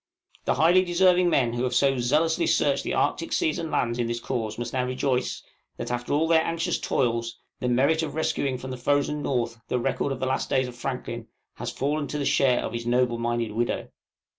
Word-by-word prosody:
The - - +2
highly 175 +4 +5
deserving 180 0 +4
men 120 -7 +2
who 120 - -2
have 125 -1 0
so 135 +1 +3
zealously 160 - +2
searched - - +2
the - - -2
Arctic - - 0
seas 335 -3 +1
and 165 - -3
lands 120 -3 0
in 120 - 0
this 120 0 -2
cause 110 -2 -3
must 120 0 -4
now 130 -1 +1
rejoice, 130 0 -1 0.3
that - - -4
after 120 0 -3
all 155 +3 +2
their 165 -1 +5
anxious 165 +2 -1
toils, 115 -2 -1 0.2
the 125 - -1
merit 140 +6 +3
of 155 -2 -4
rescuing 140 -4 0
from 130 +1 -7
the 130 - -5
frozen 145 +3 0
North 120 -4 -2
the - - 0
record 130 +3 -1
of 135 - -3
the 130 - -1
last 130 +1 -1
days 130 -1 +2
of 125 - -9
Franklin, 120 -2 -5 0.3
has - - -4
fallen 145 +1 -1
to 150 - -4
the 145 - -2
share 130 -3 +3
of - - -5
his 115 0 -4
noble 120 -1 +2
minded 120 -1 -1
widow. 120 +3 -2
130 Hz, 215 wpm, -26 LUFS, 120-150 Hz, 0.3 s, highly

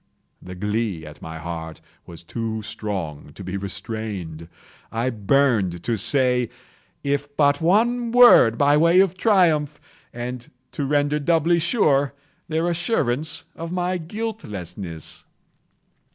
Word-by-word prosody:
The 90 0 -9
glee 105 -3 -2
at 75 -1 -12
my 80 0 -7
heart 80 -1 -6 0.3
was 85 0 -11
too 110 +3 -4
strong 95 -10 -5
to 100 - -9
be 95 +1 -5
restrained. 100 -4 -5 0.4
I 120 +3 -1
burned 105 -6 +1
to 115 - 0
say 125 +2 +2 0.5
if 145 0 -2
but 145 0 +3
one 230 +7 +2
word, 240 - +7
by 145 +2 +4
way 170 +3 +5
of 190 -2 +3
triumph, 165 -8 +2 0.3
and 120 0 -6 0.2
to 145 - -3
render 145 +1 +1
doubly 165 +2 +2
sure 145 - +2 0.3
their 165 +1 0
assurance 160 - -1
of 165 +1 -6
my 180 0 -1
guiltlessness. 100 - -6
130 Hz, 125 wpm, -23 LUFS, 100-165 Hz, 0.5 s, word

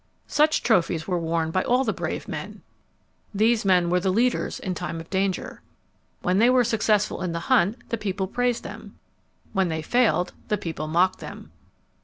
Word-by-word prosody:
Such 305 +1 +2
trophies 170 -7 +1
were 180 -2 0
worn 165 -1 -1
by 185 - +1
all 250 +2 +2
the 220 - 0
brave - - -4
men. - - -7 0.7
These 220 +2 +3
men 180 -3 +3
were 180 - +3
the 190 +1 0
leaders 240 +5 0
in 185 - -3
time 175 -1 -4
of 165 - -11
danger. 190 -1 -2 0.6
When 185 +2 +2
they 235 +3 +5
were 250 -1 +5
successful 215 -3 +1
in 180 -2 -2
the 170 - -3
hunt, 205 +8 +2
the 230 - -2
people 195 -2 -2
praised 245 +4 -1
them. - - -10 0.6
When 190 -3 +1
they 160 -1 -3
failed, 225 -3 +2
the 210 - 0
people 160 -5 -5
mocked 180 +4 +2
them. - - -10
190 Hz, 180 wpm, -25 LUFS, 175-225 Hz, 0.7 s, they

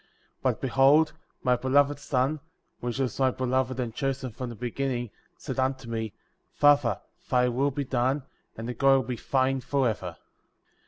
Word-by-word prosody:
^ - - -36
2. - - -35 0.3
But, - - +1
behold, 135 +4 +4 0.3
my 125 -1 +4
Beloved 140 +3 +2
Son,^ 135 +2 0 0.4
which 120 0 -3
was 130 -3 -2
my 130 -1 +4
Beloved 130 0 -1
and 120 -3 -2
Chosen^' 135 -2 -2
from 125 +2 -5
the 120 - -7
beginning,* 120 0 -2 0.3
said - - -5
unto 130 -1 -1
me 110 -2 -3 0.2
— - - -46
Father, 145 -8 +5 0.3
thy 125 -1 +3
will 135 +4 +1
be 140 0 -3
done, 130 +2 0 0.3
and 115 +1 -5
the 125 - -3
glory 135 0 +4
be 125 +1 -3
thine 130 +2 +1
forever. 110 -11 -1
130 Hz, 170 wpm, -27 LUFS, 120-135 Hz, 0.4 s, Father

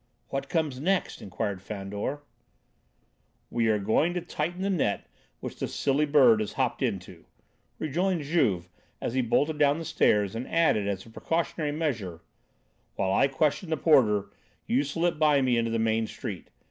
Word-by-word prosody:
"What 135 - -3
comes 155 -6 -1
next?" 185 +6 0
inquired 100 0 -4
Fandor. 105 +8 -5 1.3
"We 115 -1 +1
are 110 -1 +3
going 145 - +1
to 180 - -1
tighten 175 +2 -3
the 200 - 0
net 140 - 0 0.4
which - - -7
the - - -1
silly 145 +2 +1
bird 130 -7 +6
has 110 - -3
hopped - - -1
into," - - -3 0.5
rejoined 170 +2 0
Juve, 105 - +1 0.3
as - - -3
he 130 - +2
bolted 145 +6 +1
down 145 0 +4
the 165 - -5
stairs, 105 -8 +2
and 120 +3 -4
added 160 -12 +2
as 95 -2 -3
a 115 - -14
precautionary 160 +2 -2
measure: 120 - -3 0.7
"While 95 -1 0
I 135 - +4
question 150 +5 0
the 160 - 0
porter, 110 -11 +3 0.3
you 130 +4 +2
slip 165 +3 -1
by 150 -2 +4
me 125 -2 +2
into 115 0 +1
the 115 - 0
main 110 0 +1
street. 105 -3 -7
135 Hz, 165 wpm, -27 LUFS, 105-155 Hz, 1.3 s, bird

